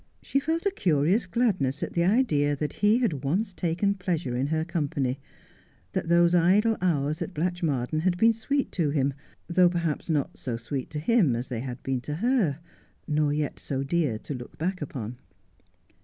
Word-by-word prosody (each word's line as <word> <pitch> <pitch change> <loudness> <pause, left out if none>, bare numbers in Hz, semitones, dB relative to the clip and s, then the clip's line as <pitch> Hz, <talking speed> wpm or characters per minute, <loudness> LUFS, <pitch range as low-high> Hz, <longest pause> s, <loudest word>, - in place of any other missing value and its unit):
She 275 - +1
felt 320 +5 -1
a 400 - +3
curious 180 - +2
gladness 180 - 0
at - - -4
the 170 - +2
idea 175 - +2
that 150 +1 -3
he 210 +2 +3
had 180 - -1
once 190 +9 0
taken 180 +4 0
pleasure 175 -9 -2
in 130 +3 0
her 160 +1 0
company 140 -5 -1 0.4
— 90 - -33
that 165 - -2
those 170 0 +5
idle 195 +6 +4
hours 155 -4 0
at 190 - -4
Blatchmardean 155 -5 -1
had 175 +2 +1
been 225 +4 +5
sweet 275 +6 -1
to 165 -5 0
him, 140 -1 +1 0.3
though 175 +1 +4
perhaps 170 -2 -2
not 150 -4 -1
so 120 -3 -3
sweet 130 +3 -4
to 150 - -4
him 170 - +3
as 120 +2 -4
they 120 -3 -3
had 125 0 -6
been 130 -2 -1
to 150 +3 -4
her, 210 - +1 0.5
nor 150 -2 +1
yet 150 -1 -2
so 135 -1 -3
dear 145 -5 0
to 145 - -6
look 125 -2 -9
back 180 +3 -2
upon. 125 -4 -5
160 Hz, 185 wpm, -27 LUFS, 140-185 Hz, 0.5 s, those